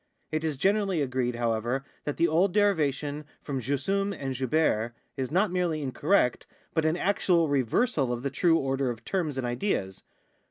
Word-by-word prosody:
It 155 0 -1
is 155 -3 -1
generally 195 +2 +2
agreed, 125 -2 -1
however, 120 +3 -1 0.2
that 145 - -3
the 170 - +4
old 175 +4 +2
derivation 150 -7 +1 0.2
from 135 -3 -4
jussuin 195 - 0
and 135 -1 -3
juhere 125 -3 +1 0.2
is 130 -2 -3
not 190 +4 +2
merel}^ 175 -4 0
incorrect, 135 +1 +1 0.3
but 160 -1 +1
an 160 +2 +2
actual 180 -4 +2
reversal 140 - +1
of 120 0 -3
the 140 - -1
tnie 165 +4 +3
order 135 -3 0
of 120 -1 -6
terms 165 -8 -1
and 130 - -1
ideas. 120 - -2
145 Hz, 165 wpm, -28 LUFS, 130-175 Hz, 0.3 s, the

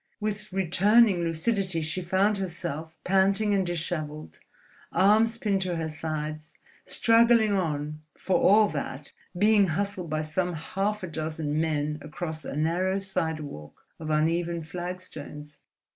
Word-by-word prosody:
With 210 -1 -3
returning 195 +3 +4
lucidity 170 +1 0
she 165 +4 -3
found 195 +3 +1
herself, 165 -3 -5
panting 195 +2 +3
and 195 -1 +2
dishevelled, 155 - -4 0.5
arms 220 +4 +4
pinned 200 -4 0
to 180 -2 -1
her 160 -1 -2
sides, 155 0 -5 0.3
struggling 230 -2 +4
on 150 -5 -2 0.2
for 185 -2 +1
all 210 +2 +6
that, 145 -2 -5 0.3
being 205 0 +5
hustled 180 0 -2
by 155 0 -1
some 175 +4 -1
half 195 +6 -2
a - - -3
dozen 155 -1 -2
men 150 -1 -1
across 155 +1 -6
a - - -6
narrow 175 +5 +1
sidewalk 160 - -4
of 155 -1 -6
uneven 165 +2 +1
flagstones. 155 -4 -7
175 Hz, 130 wpm, -27 LUFS, 155-195 Hz, 0.5 s, all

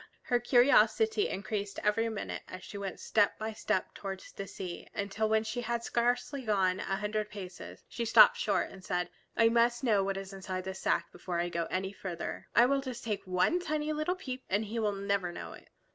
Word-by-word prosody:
Her 245 - +2
curiosity 285 - +4
increased 200 +1 -3
every 225 +2 +2
minute 220 -2 -4
as 185 0 -9
she 205 - -10
went 200 -2 -5
step 205 -2 +2
by 220 0 -4
step 190 -3 -1
towards 195 -1 -7
the 195 - -6
sea, 180 -3 -7
until 205 +2 -1
when 220 0 +3
she 245 +2 -3
had 235 0 -1
gone 240 +1 +2
scarcely 260 0 -8
a 210 - +3 0.3
hundred 210 +2 -2
paces 190 -3 -9
she 235 - -4
stopped 230 - +8
short 480 - 0
and 190 -1 -12
said, 180 -1 -1 0.3
"I 230 -1 +6
must 235 +2 +3
know 210 -6 +3
what 195 0 -1
is 195 0 -6
inside 185 -1 -4
this 190 0 -5
sack - - 0
before 175 -2 -4
I 175 0 0
go 170 -1 -1
any 190 +2 -2
farther. 180 -3 -5
I 235 - +8
will 275 +2 +2
take 260 -2 -5
just 210 -3 -3
one 185 - +2
tiny 310 -3 -1
little 310 +4 0
peep, 260 -8 -6
and 205 +3 +1
He 225 +3 -3
will 210 -2 +1
never 200 -2 -1
know - - -7
it." - - -15
210 Hz, 205 wpm, -31 LUFS, 195-240 Hz, 0.3 s, stopped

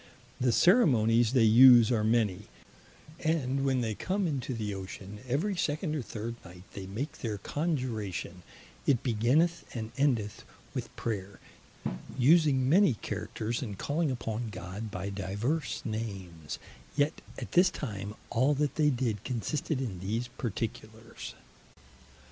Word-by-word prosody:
The 125 -1 +3
Ceremonies 120 - +4
they 125 -4 +5
use 120 +1 +8
are 110 -3 +2
many, 110 -3 +1 0.7
and 140 -4 0
when 130 -2 +2
they 110 -2 -1
come 190 - -1
into 135 -5 -2
the 105 -2 -3
Ocean, 95 +1 -7
every 160 +11 0
second 155 -1 -1
or 150 - -1
third 115 0 -5
night 90 0 -12
they 95 -1 -7
make 115 +10 -5
their 110 -3 -3
Conjuration; 110 - -3 0.5
it 130 -5 +3
beginneth 135 +9 +2
and 110 -1 -4
endeth 115 -8 +1 0.3
with - - -4
Prayer, 100 -4 -4 0.8
using 135 -1 +5
many 170 - +5
Characters, 115 +2 -4
and 105 -7 -5
calling 155 - 0
upon 115 -2 -3
God 100 +3 -6
by 95 +1 -4
divers 105 - -2
names: 95 -8 -5 0.4
yet 145 +2 +1 0.2
at - - -6
this 180 +1 +6
time, 105 - -5 0.2
all 130 +5 +3
that 140 -1 -1
they 150 -2 +4
did 120 -6 -1
consisted 130 +4 -2
in 110 -9 -3
these 110 +6 -2
particulars. 110 -1 -6
120 Hz, 135 wpm, -30 LUFS, 105-140 Hz, 0.8 s, use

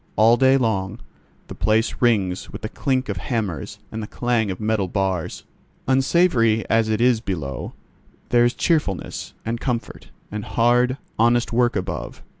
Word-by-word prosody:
All 115 +2 +6
day 130 +2 +4
long 100 -7 -1 0.5
the - - -9
place 110 +2 +1
rings 100 -7 +1
with - - -9
the 110 - -3
clink 130 0 -1
of 100 -3 -3
hammers 95 - -3
and 110 - -4
the 105 - -5
clang 120 -3 0
of 95 - -4
metal 105 -3 0
bars. 95 -2 -2 0.4
Unsavoury 130 -5 +3
as 115 -1 +3
it 110 -1 0
is 120 -2 +3
below, 80 - -4 0.6
there 120 -1 +4
is 120 +1 +2
cheerfulness, 150 - -1
and 115 +1 -3
comfort, 120 -3 -4 0.2
and 105 0 -4
hard, 125 +4 +2 0.2
honest 120 +1 +3
work 120 0 +2
above. 95 -2 -4
115 Hz, 155 wpm, -22 LUFS, 100-120 Hz, 0.6 s, All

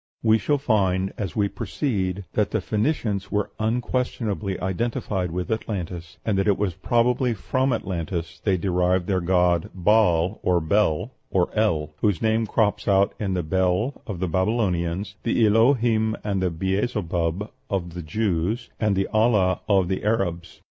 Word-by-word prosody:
We 110 0 +4
shall 145 +9 +1
find, 95 -8 +1
as 100 -5 -4
we 105 -2 +2
proceed, 100 - -2
that 105 - +1
the 110 - 0
Phoenicians 105 -1 -1
were 105 -1 -1
unquestionably 110 -3 -1
identified 95 -1 -2
with 90 +5 -4
Atlantis, 90 -5 -4
and 100 -3 +1
that 95 - +1
it 100 - +3
was 100 -4 -1
probably 120 +4 +1
from 130 +6 0
Atlantis 85 -6 -3
they 95 -3 +2
derived 90 0 +1
their 95 -1 0
god 90 -1 +2
Baal, 95 -1 +3
or 90 -1 +2
Bel, 95 +4 +1 0.2
or 90 -2 +1
El, 80 -9 +1
whose 105 -5 +1
name 110 0 +1
crops 105 -2 0
out 100 0 +3
in 95 -3 -1
the 90 - -1
Bel 95 - 0
of 100 -5 -5
the 95 - -1
Babylonians, 95 -1 -1
the 115 -1 +2
Elohim, 115 0 +3
and 100 -3 -1
the 90 - +1
Beelzebub 95 0 -1 0.2
of 90 -4 -2
the 90 - -5
Jews, 100 +6 -1
and 105 -2 +2
the 95 0 +1
Allah 110 -4 +2
of 95 -3 +4
the 95 +1 -2
Arabians. 90 -6 -2
100 Hz, 155 wpm, -24 LUFS, 90-110 Hz, 0.2 s, We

